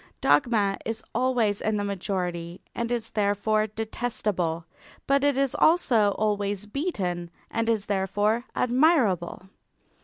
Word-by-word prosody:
Dogma 200 Hz, +6 st, +2 dB
is 225 Hz, 0 st, -4 dB
always 235 Hz, -4 st, +1 dB
in 215 Hz, 0 st, 0 dB
the 205 Hz, -, -1 dB
majority 180 Hz, -3 st, -3 dB
and 235 Hz, 0 st, -3 dB
is 235 Hz, -2 st, -2 dB
therefore 215 Hz, +1 st, +1 dB
detestable, 210 Hz, -6 st, -2 dB, 0.4 s
but 275 Hz, 0 st, +2 dB
it 285 Hz, -2 st, +2 dB
is 275 Hz, -2 st, +1 dB
also 235 Hz, -, +4 dB
always 205 Hz, -1 st, -1 dB
beaten 195 Hz, -, -3 dB, 0.2 s
and 230 Hz, 0 st, 0 dB
is 215 Hz, -3 st, +1 dB
therefore 205 Hz, +4 st, 0 dB
admirable. 240 Hz, -, +2 dB
210 Hz, 120 wpm, -26 LUFS, 195-235 Hz, 0.4 s, also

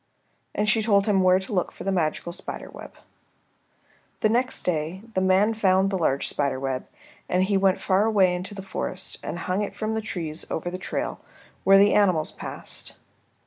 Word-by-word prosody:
And 210 Hz, -, 0 dB
she 220 Hz, +1 st, +3 dB
told 200 Hz, -2 st, +3 dB
him 200 Hz, -3 st, +3 dB
where 185 Hz, 0 st, +5 dB
to 190 Hz, +2 st, -5 dB
look 180 Hz, -3 st, 0 dB
for -, -, -10 dB
the 195 Hz, -, 0 dB
magical 170 Hz, -1 st, -1 dB
spider 170 Hz, -, -7 dB
web. -, -, -11 dB, 1.3 s
The 215 Hz, -, +4 dB
next 250 Hz, +3 st, 0 dB
day 170 Hz, +3 st, -2 dB
the 185 Hz, -, +1 dB
man 190 Hz, +4 st, +3 dB
found 195 Hz, -2 st, +3 dB
the 190 Hz, -, 0 dB
large 140 Hz, -4 st, +1 dB
spider 140 Hz, -2 st, -1 dB
web, 130 Hz, -1 st, -3 dB, 0.4 s
and 180 Hz, +1 st, +2 dB
he 200 Hz, +1 st, +1 dB
went 195 Hz, -1 st, +3 dB
far 195 Hz, +2 st, +2 dB
away 195 Hz, -5 st, +4 dB
into 180 Hz, +3 st, -5 dB
the 195 Hz, -, -7 dB
forest 185 Hz, -1 st, -4 dB
and -, -, -5 dB
hung 185 Hz, +3 st, -1 dB
it 205 Hz, -, -4 dB
from 220 Hz, 0 st, -2 dB
the 220 Hz, -, -1 dB
trees 165 Hz, -7 st, -4 dB
over 175 Hz, +2 st, -3 dB
the 185 Hz, -, -5 dB
trail -, -, -3 dB, 0.5 s
where 195 Hz, +1 st, +8 dB
the 200 Hz, +1 st, +5 dB
animals 185 Hz, -7 st, +3 dB
passed. -, -, -7 dB
190 Hz, 190 wpm, -25 LUFS, 180-205 Hz, 1.3 s, where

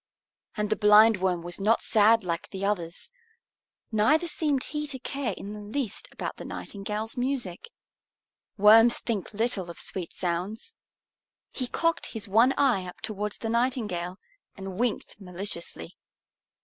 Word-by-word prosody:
And 210 Hz, 0 st, -1 dB
the -, -, +4 dB
Blindworm 210 Hz, -4 st, +5 dB
was 175 Hz, +2 st, -4 dB
not 215 Hz, +4 st, +2 dB
sad 220 Hz, +1 st, +4 dB
like 170 Hz, -2 st, -3 dB
the 195 Hz, 0 st, -4 dB
others, 175 Hz, -, -3 dB, 0.8 s
neither 305 Hz, +11 st, +3 dB
seemed 295 Hz, -5 st, 0 dB
he 300 Hz, 0 st, -4 dB
to 270 Hz, -2 st, -3 dB
care 260 Hz, -5 st, -3 dB
in 205 Hz, +1 st, -7 dB
the 210 Hz, -, -8 dB
least 220 Hz, +3 st, -3 dB
about -, -, -5 dB
the -, -, -7 dB
Nightingale's 210 Hz, +2 st, -5 dB
music. 245 Hz, -, -3 dB, 0.9 s
Worms 225 Hz, +3 st, +7 dB
think 215 Hz, -6 st, -3 dB
little 210 Hz, -4 st, -1 dB
of 170 Hz, -, -8 dB
sweet 180 Hz, -3 st, -3 dB
sounds. 190 Hz, -, -3 dB, 0.8 s
He 255 Hz, -, -1 dB
cocked 330 Hz, +6 st, 0 dB
his 220 Hz, -3 st, -4 dB
one 230 Hz, +7 st, +5 dB
eye 240 Hz, -10 st, +2 dB
up 180 Hz, -, -10 dB
towards 210 Hz, -1 st, -4 dB
the 225 Hz, -, -4 dB
Nightingale 220 Hz, -7 st, -1 dB, 0.4 s
and 195 Hz, 0 st, -7 dB
winked 235 Hz, -3 st, -2 dB
maliciously. 180 Hz, -, -5 dB
210 Hz, 140 wpm, -27 LUFS, 190-240 Hz, 0.9 s, Worms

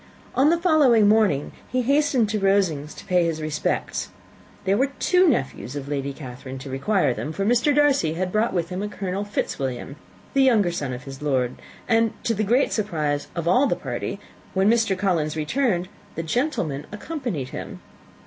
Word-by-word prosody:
On 275 Hz, +3 st, +4 dB
the 340 Hz, -, +3 dB
following 285 Hz, -, +5 dB
morning 205 Hz, -10 st, +3 dB, 0.2 s
he 255 Hz, 0 st, +1 dB
hastened 280 Hz, -3 st, +3 dB
to 215 Hz, 0 st, 0 dB
Rosings 190 Hz, -7 st, +1 dB
to -, -, -11 dB
pay 180 Hz, -1 st, +3 dB
his 165 Hz, -1 st, -1 dB
respects. 155 Hz, -1 st, -2 dB, 0.6 s
There 195 Hz, +1 st, +3 dB
were 265 Hz, +6 st, +2 dB
two 365 Hz, 0 st, +4 dB
nephews 135 Hz, -, -2 dB
of 140 Hz, -1 st, -5 dB
Lady 140 Hz, -1 st, -2 dB
Catherine 130 Hz, -1 st, -8 dB
to 135 Hz, +1 st, -8 dB
require 185 Hz, +10 st, +1 dB
them, 150 Hz, -, -4 dB
for 195 Hz, +4 st, -2 dB
Mr. 245 Hz, +6 st, +3 dB
Darcy 280 Hz, -, +3 dB
had 180 Hz, +1 st, -2 dB
brought 215 Hz, +3 st, +1 dB
with 175 Hz, -2 st, -1 dB
him 185 Hz, +1 st, -4 dB
a 210 Hz, -, -2 dB
Colonel 195 Hz, -1 st, -3 dB
Fitzwilliam, 135 Hz, -9 st, -3 dB, 0.4 s
the 275 Hz, -, +4 dB
younger 220 Hz, -9 st, +4 dB
son 145 Hz, -6 st, -3 dB
of 125 Hz, +1 st, -6 dB
his 135 Hz, -2 st, -8 dB
uncle, 150 Hz, +2 st, -3 dB
Lord; 125 Hz, -1 st, 0 dB, 0.3 s
and, 225 Hz, -1 st, +3 dB
to 230 Hz, -, +1 dB
the 215 Hz, 0 st, -1 dB
great 240 Hz, +7 st, +2 dB
surprise 155 Hz, -9 st, -1 dB
of 170 Hz, -1 st, -3 dB
all 250 Hz, +11 st, +4 dB
the -, -, +1 dB
party, -, -, -4 dB, 0.4 s
when 190 Hz, +3 st, +4 dB
Mr. 225 Hz, -5 st, +2 dB
Collins 165 Hz, -6 st, 0 dB
returned, 180 Hz, -, 0 dB, 0.3 s
the 165 Hz, -, -3 dB
gentlemen 165 Hz, -, -1 dB
accompanied 210 Hz, -, -4 dB
him. -, -, -7 dB
190 Hz, 185 wpm, -24 LUFS, 150-235 Hz, 0.6 s, following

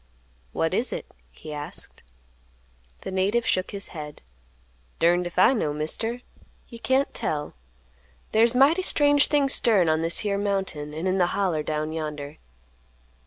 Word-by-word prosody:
"What -, -, -1 dB
is -, -, 0 dB
it?" -, -, -5 dB, 0.2 s
he 65 Hz, -, -10 dB
asked. 145 Hz, 0 st, -8 dB, 1.0 s
The -, -, -6 dB
native 200 Hz, +5 st, 0 dB
shook 185 Hz, -, 0 dB
his 200 Hz, -1 st, -7 dB
head. 150 Hz, -3 st, -9 dB, 0.7 s
"Durned 175 Hz, +1 st, +2 dB
if 175 Hz, -, -11 dB
I 215 Hz, +8 st, +6 dB
know, 155 Hz, -, -1 dB
Mister. 160 Hz, +10 st, -2 dB, 0.5 s
You 235 Hz, -, -10 dB
can't 265 Hz, +3 st, +1 dB
tell. 150 Hz, -1 st, -3 dB, 0.8 s
There's 230 Hz, +2 st, +3 dB
mighty 290 Hz, +8 st, +4 dB
strange 290 Hz, -5 st, +4 dB
things 285 Hz, -3 st, +3 dB
stirrin' 200 Hz, -8 st, +4 dB
on 155 Hz, 0 st, +1 dB
this 165 Hz, +1 st, +1 dB
here 200 Hz, -1 st, 0 dB
mountain, 190 Hz, -7 st, -2 dB
an' 160 Hz, +3 st, -4 dB
in 190 Hz, +1 st, +1 dB
the 175 Hz, -, +3 dB
Holler 180 Hz, -6 st, 0 dB
down 155 Hz, +1 st, -3 dB
yonder. 150 Hz, -2 st, -5 dB
185 Hz, 150 wpm, -25 LUFS, 155-230 Hz, 1.0 s, I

